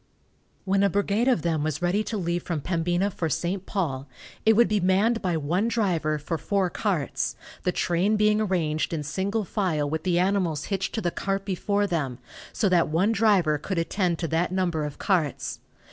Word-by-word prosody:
When 195 Hz, 0 st, +2 dB
a 200 Hz, -, +4 dB
brigade 205 Hz, +5 st, +1 dB
of 245 Hz, -, +2 dB
them 165 Hz, -3 st, 0 dB
was 155 Hz, +1 st, -2 dB
ready 190 Hz, +5 st, +2 dB
to 220 Hz, -, -3 dB
leave 175 Hz, -2 st, -1 dB
from 165 Hz, -3 st, -3 dB
Pembina 175 Hz, +4 st, 0 dB
for 165 Hz, -3 st, -2 dB
St. 180 Hz, +6 st, -2 dB
Paul, 145 Hz, -9 st, -2 dB, 0.4 s
it 220 Hz, -, +8 dB
would 235 Hz, +2 st, +5 dB
be 210 Hz, 0 st, +1 dB
manned 200 Hz, +6 st, +2 dB
by 175 Hz, -3 st, 0 dB
one 170 Hz, +8 st, 0 dB
driver 175 Hz, -10 st, 0 dB
for 155 Hz, +2 st, -4 dB
four 195 Hz, -1 st, 0 dB
carts, 180 Hz, -9 st, -1 dB, 0.3 s
the 180 Hz, -, +1 dB
train 180 Hz, +5 st, +1 dB
being 210 Hz, 0 st, +3 dB
arranged 170 Hz, -5 st, 0 dB
in 155 Hz, -2 st, -2 dB
single 195 Hz, +8 st, -1 dB
file 170 Hz, -7 st, 0 dB
with 155 Hz, +2 st, -2 dB
the 175 Hz, -1 st, +1 dB
animals 180 Hz, -5 st, +1 dB
hitched 190 Hz, 0 st, -2 dB
to 220 Hz, -, -1 dB
the 175 Hz, -, 0 dB
cart 195 Hz, +2 st, -2 dB
before 200 Hz, +2 st, 0 dB
them, 150 Hz, -10 st, -2 dB, 0.3 s
so 210 Hz, -, +1 dB
that 180 Hz, -3 st, +3 dB
one 175 Hz, +8 st, +2 dB
driver 195 Hz, -9 st, +3 dB
could 185 Hz, +5 st, -4 dB
attend 170 Hz, +1 st, 0 dB
to 165 Hz, -, -2 dB
that 170 Hz, +2 st, 0 dB
number 175 Hz, -5 st, 0 dB
of 150 Hz, -, -6 dB
carts. 175 Hz, -8 st, -1 dB
180 Hz, 190 wpm, -26 LUFS, 160-200 Hz, 0.4 s, it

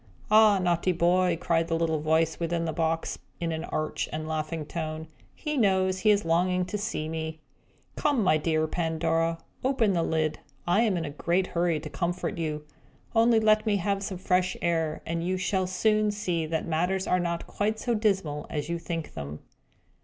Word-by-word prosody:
"Ah, 215 Hz, -1 st, +7 dB
naughty 180 Hz, 0 st, +1 dB
boy!" 175 Hz, 0 st, +2 dB
cried 165 Hz, -2 st, +1 dB
the 165 Hz, -, 0 dB
little 160 Hz, -1 st, 0 dB
voice 160 Hz, +1 st, +1 dB
within 170 Hz, 0 st, -1 dB
the 160 Hz, -, -2 dB
box, 165 Hz, 0 st, -1 dB, 0.2 s
in 170 Hz, -1 st, -1 dB
an 160 Hz, +1 st, -3 dB
arch 155 Hz, 0 st, -2 dB
and 155 Hz, 0 st, -4 dB
laughing 155 Hz, 0 st, -3 dB
tone. 155 Hz, 0 st, -4 dB, 0.3 s
"He 300 Hz, -1 st, -3 dB
knows 190 Hz, -4 st, +2 dB
he 215 Hz, -, +3 dB
is 205 Hz, -2 st, +3 dB
longing 180 Hz, +2 st, +2 dB
to 195 Hz, +3 st, -3 dB
see 175 Hz, -7 st, -3 dB
me. 160 Hz, 0 st, -4 dB, 0.6 s
Come, 285 Hz, -7 st, +1 dB
my 155 Hz, -5 st, +4 dB
dear 155 Hz, 0 st, +1 dB
Pandora, 165 Hz, 0 st, 0 dB, 0.2 s
lift 270 Hz, +1 st, 0 dB
up 215 Hz, -4 st, +4 dB
the 170 Hz, -, +1 dB
lid. 155 Hz, -2 st, 0 dB, 0.3 s
I 175 Hz, +5 st, +3 dB
am 215 Hz, -6 st, +2 dB
in 165 Hz, -, -2 dB
a 145 Hz, -, -5 dB
great 170 Hz, +5 st, 0 dB
hurry 170 Hz, -3 st, 0 dB
to 155 Hz, -, -7 dB
comfort 175 Hz, -1 st, -2 dB
you. 150 Hz, -2 st, -3 dB, 0.5 s
Only 230 Hz, 0 st, +5 dB
let 215 Hz, 0 st, +3 dB
me 210 Hz, -, +3 dB
have 195 Hz, +1 st, 0 dB
some 195 Hz, -1 st, -4 dB
fresh 180 Hz, 0 st, +1 dB
air, 165 Hz, -3 st, -1 dB
and 165 Hz, 0 st, -2 dB
you 185 Hz, +2 st, 0 dB
shall 185 Hz, 0 st, 0 dB
soon 215 Hz, +3 st, +2 dB
see 180 Hz, -6 st, -1 dB
that 160 Hz, 0 st, -2 dB
matters 180 Hz, +4 st, 0 dB
are 180 Hz, -, +2 dB
not 170 Hz, -1 st, -2 dB
quite 215 Hz, +2 st, -1 dB
so 240 Hz, +2 st, -1 dB
dismal 195 Hz, -9 st, 0 dB
as 150 Hz, +1 st, -3 dB
you 170 Hz, 0 st, -1 dB
think 165 Hz, -1 st, -5 dB
them!" 70 Hz, +1 st, -6 dB
170 Hz, 190 wpm, -27 LUFS, 160-190 Hz, 0.6 s, Ah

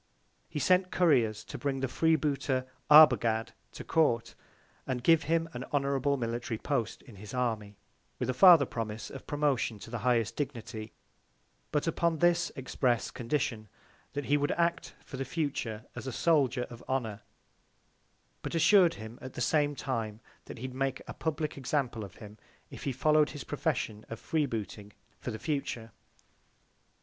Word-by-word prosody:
He -, -, -6 dB
sent 185 Hz, +5 st, +3 dB
Couriers 120 Hz, -, +2 dB
to -, -, -8 dB
bring 135 Hz, -2 st, -2 dB
the 135 Hz, -, 0 dB
Free 160 Hz, +5 st, +3 dB
booter 140 Hz, -4 st, -1 dB, 0.2 s
Arbogad 120 Hz, -7 st, +6 dB, 0.2 s
to -, -, -7 dB
Court, 120 Hz, -8 st, +1 dB, 0.5 s
and 125 Hz, -2 st, -2 dB
gave 165 Hz, -1 st, +5 dB
him 165 Hz, +1 st, +1 dB
an 120 Hz, -, -5 dB
Honourable 140 Hz, 0 st, 0 dB
Military 120 Hz, -1 st, -3 dB
Post 115 Hz, -3 st, -2 dB
in 115 Hz, -6 st, -14 dB
his 105 Hz, +5 st, -9 dB
Army, 110 Hz, -5 st, -2 dB, 0.4 s
with 125 Hz, -, -2 dB
a 130 Hz, -, 0 dB
farther 165 Hz, +1 st, +8 dB
Promise 110 Hz, -2 st, -5 dB
of 135 Hz, -, -10 dB
Promotion 145 Hz, -6 st, 0 dB
to 115 Hz, -, -11 dB
the 120 Hz, -, -3 dB
highest 115 Hz, -2 st, +1 dB
Dignity; 115 Hz, -6 st, -5 dB, 0.8 s
but 150 Hz, -1 st, 0 dB
upon 165 Hz, 0 st, +1 dB
this 175 Hz, +1 st, +3 dB
express 130 Hz, -3 st, 0 dB
Condition, 115 Hz, -3 st, -2 dB, 0.5 s
that 145 Hz, 0 st, -3 dB
he 145 Hz, +3 st, +3 dB
would 145 Hz, 0 st, 0 dB
act 170 Hz, 0 st, -1 dB
for 135 Hz, -, -8 dB
the 135 Hz, -, -2 dB
future 130 Hz, -7 st, -3 dB
as -, -, -6 dB
a -, -, -2 dB
Soldier 130 Hz, -3 st, +2 dB
of 120 Hz, -, -10 dB
Honour; 115 Hz, -6 st, -2 dB, 1.2 s
but -, -, -4 dB
assur'd 175 Hz, +1 st, +5 dB
him 110 Hz, +2 st, -9 dB
at 130 Hz, -, -8 dB
the -, -, -5 dB
same 145 Hz, +3 st, +2 dB
Time, 115 Hz, -6 st, -3 dB, 0.3 s
that -, -, -9 dB
he'd 130 Hz, +2 st, -6 dB
make 135 Hz, 0 st, -2 dB
a -, -, -6 dB
publick 155 Hz, -2 st, -3 dB
Example 130 Hz, -5 st, -1 dB
of 100 Hz, -, -10 dB
him, 105 Hz, -1 st, -12 dB, 0.3 s
if -, -, -9 dB
he 140 Hz, -, 0 dB
follow'd 150 Hz, +3 st, +3 dB
his 145 Hz, -, -7 dB
Profession 135 Hz, -7 st, -2 dB
of 115 Hz, -, -6 dB
Free 155 Hz, -3 st, 0 dB
booting 105 Hz, -3 st, -6 dB, 0.3 s
for -, -, -5 dB
the 110 Hz, -, -4 dB
future. 125 Hz, -6 st, -3 dB
130 Hz, 165 wpm, -30 LUFS, 115-150 Hz, 1.2 s, farther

